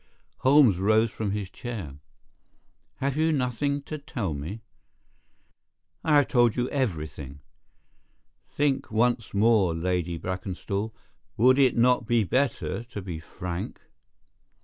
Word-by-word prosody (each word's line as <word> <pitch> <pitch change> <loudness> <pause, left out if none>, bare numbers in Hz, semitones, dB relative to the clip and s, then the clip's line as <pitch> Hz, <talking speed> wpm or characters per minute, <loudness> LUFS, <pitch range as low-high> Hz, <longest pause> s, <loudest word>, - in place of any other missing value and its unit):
Holmes 130 -8 +5
rose 110 +3 +3
from 110 -3 -3
his 100 -1 -2
chair. 100 - -6 1.0
"Have 140 0 -2
you 160 +1 +2
nothing 140 +1 -1
to 155 +1 -6
tell 115 - -3
me?" 80 +10 -6 1.4
"I 155 - +3
have 145 -2 +5
told 120 -3 +3
you 125 0 0
everything." 80 - -3 1.1
"Think 145 -2 0
once 115 0 +1
more, 100 -5 +3
Lady 90 0 -1
Brackenstall. 95 +4 -4 0.5
Would 130 +4 +5
it 130 -3 +4
not 125 -1 +3
be 120 -1 +3
better 125 +2 -1
to 115 -3 -7
be 85 -4 -5
frank?" 85 +2 -6
110 Hz, 120 wpm, -26 LUFS, 90-130 Hz, 1.4 s, Holmes